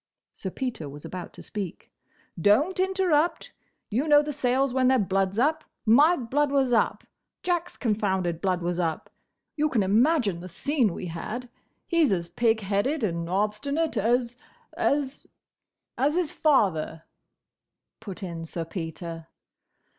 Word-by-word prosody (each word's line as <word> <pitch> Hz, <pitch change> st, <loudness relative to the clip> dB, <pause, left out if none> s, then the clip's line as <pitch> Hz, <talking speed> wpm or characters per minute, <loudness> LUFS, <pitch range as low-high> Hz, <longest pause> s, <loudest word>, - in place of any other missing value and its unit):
Sir 190 Hz, -, -5 dB
Peter 225 Hz, -, -4 dB
was 145 Hz, +1 st, -10 dB
about 180 Hz, -1 st, -6 dB
to -, -, -11 dB
speak. 200 Hz, -5 st, -6 dB, 0.5 s
"Don't 290 Hz, -, +3 dB
interrupt!—You 345 Hz, -, -1 dB
know 295 Hz, -1 st, +6 dB
the 295 Hz, 0 st, -4 dB
Sayles 260 Hz, -1 st, +1 dB
when 260 Hz, -1 st, +3 dB
their 260 Hz, 0 st, +5 dB
blood 195 Hz, -2 st, 0 dB
's -, -, -8 dB
up. 310 Hz, +6 st, +2 dB, 0.2 s
My 290 Hz, +10 st, +6 dB
blood 275 Hz, +4 st, 0 dB
was 270 Hz, -3 st, +2 dB
up. 225 Hz, -, +2 dB, 0.4 s
Jack's 350 Hz, -1 st, -1 dB
confounded 190 Hz, -7 st, 0 dB
blood 185 Hz, -2 st, 0 dB
was 175 Hz, 0 st, -1 dB
up. 165 Hz, -3 st, -2 dB, 0.4 s
You 305 Hz, 0 st, +1 dB
can 230 Hz, -8 st, +2 dB
imagine 220 Hz, -, +3 dB
the 180 Hz, +2 st, -8 dB
scene 245 Hz, -, 0 dB
we -, -, -5 dB
had. 215 Hz, +9 st, -5 dB, 0.4 s
He's 335 Hz, -, +3 dB
as 170 Hz, -3 st, -1 dB
pig 225 Hz, +4 st, +1 dB
headed 210 Hz, +9 st, 0 dB
and 170 Hz, -4 st, -1 dB
obstinate 215 Hz, -, 0 dB
as—as—" 255 Hz, -, -1 dB, 0.7 s
"As 290 Hz, +4 st, +2 dB
his 350 Hz, -4 st, 0 dB
father," 185 Hz, -, +1 dB, 1.0 s
put 200 Hz, -2 st, -8 dB
in 170 Hz, -3 st, -5 dB
Sir 165 Hz, 0 st, -5 dB
Peter. 165 Hz, -1 st, -6 dB
230 Hz, 140 wpm, -26 LUFS, 185-290 Hz, 1.0 s, know